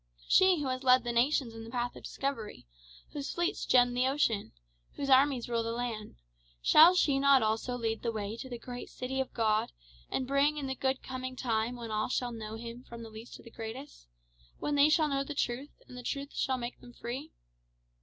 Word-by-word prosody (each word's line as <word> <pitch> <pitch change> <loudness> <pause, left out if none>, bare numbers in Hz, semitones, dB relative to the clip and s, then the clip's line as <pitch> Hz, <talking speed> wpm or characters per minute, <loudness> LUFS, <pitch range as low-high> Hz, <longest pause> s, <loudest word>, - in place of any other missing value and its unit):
She 375 -3 +5
who 280 - -2
has 255 0 -2
led 255 -2 +5
the 240 - -2
nations 245 0 +2
in 225 0 -8
the 225 - -9
path 245 0 -2
of - - -10
discovery 270 - -4 0.5
whose 285 -2 -4
fleets 345 0 -1
gem 245 -1 +5
the 250 +1 +2
ocean 265 -7 0 0.4
whose 275 -1 -2
armies 265 -2 +4
rule 235 -1 0
the 230 0 -2
land, 235 -3 -4 0.4
shall 325 - +7
she 285 -6 +3
not 275 -3 +5
also 220 +3 -1
lead 225 -2 -2
the 230 - -1
way 210 -1 -4
to 260 - -7
the 240 - -5
great 245 +1 -8
city 260 +1 -4
of 265 - -5
God, 215 -2 +1 0.4
and 260 - -1
bring 280 +3 +2
in 285 - -3
the 265 - -2
good 265 0 -1
coming 255 0 -5
time 235 -1 -1
when 235 -2 -7
all 215 0 0
shall 245 -1 -1
know 220 -1 -6
him 235 +2 -8
from 235 -2 -10
the 225 - -10
least 220 +2 -10
to - - -13
the 230 - -13
greatest 230 - -8 0.5
when 295 - -2
they 290 +1 +5
shall 310 0 +4
know 275 -1 0
the 290 +1 -6
truth, 265 +2 -3
and 250 - -11
the 250 - -7
truth 280 +3 -4
shall 260 -1 0
make 240 0 -6
them 245 - -13
free? 260 +8 -6
250 Hz, 215 wpm, -31 LUFS, 230-275 Hz, 0.5 s, shall